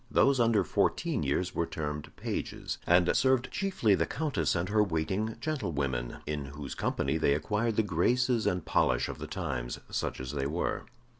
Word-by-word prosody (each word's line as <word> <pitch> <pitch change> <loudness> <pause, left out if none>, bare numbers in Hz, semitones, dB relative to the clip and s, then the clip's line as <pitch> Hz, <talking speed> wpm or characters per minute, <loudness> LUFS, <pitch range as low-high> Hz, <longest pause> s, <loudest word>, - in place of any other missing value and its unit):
Those 135 -1 +4
under 115 -4 +4
fourteen - - +1
years 90 +6 0
were 85 - 0
termed 75 -2 -4
pages, - - -4
and 90 0 +4
served 130 +1 +3
chiefly 190 - +1
the - - +2
Countess 150 -7 0
and 85 +1 0
her 105 +2 +3
waiting 95 +4 0
gentlewomen, 70 - -2
in 75 -2 -3
whose 70 0 -7
company 70 +4 0
they 70 -2 +3
acquired 105 +8 0
the 110 - +3
graces 115 +6 +2
and 90 -2 0
polish - - +2
of - - -6
the - - -5
times, - - -3
such - - -2
as 65 0 -4
they 70 -2 -1
were. 85 +5 -2
90 Hz, 170 wpm, -30 LUFS, 75-115 Hz, -, Those